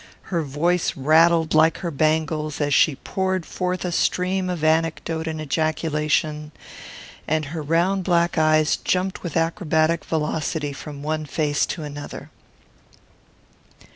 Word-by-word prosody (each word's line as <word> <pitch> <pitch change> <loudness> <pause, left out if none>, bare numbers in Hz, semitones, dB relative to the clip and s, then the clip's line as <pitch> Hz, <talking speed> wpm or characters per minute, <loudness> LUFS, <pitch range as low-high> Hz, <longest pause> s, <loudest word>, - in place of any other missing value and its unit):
Her 170 - +2
voice 165 +5 0
rattled 160 +3 +4
like 160 +1 +4
her 170 -3 -4
bangles 155 0 0
as 145 -1 0
she 150 +1 +4
poured 190 +4 -2
forth 180 0 -3
a 180 - -2
stream 185 +2 0
of 175 -4 -3
anecdote 160 0 0
and 160 -1 -3
ejaculation; 155 0 -1 0.8
and 155 0 0
her 155 +3 -5
round 175 +6 +1
black 170 -1 +2
eyes 155 -1 +3
jumped 185 +1 -1
with 170 -2 -3
acrobatic 165 -1 +1
velocity 150 -1 -2
from 145 +1 -9
one 155 0 -2
face 150 0 0
to 160 - -5
another. 145 -1 -8
160 Hz, 130 wpm, -23 LUFS, 150-170 Hz, 0.8 s, rattled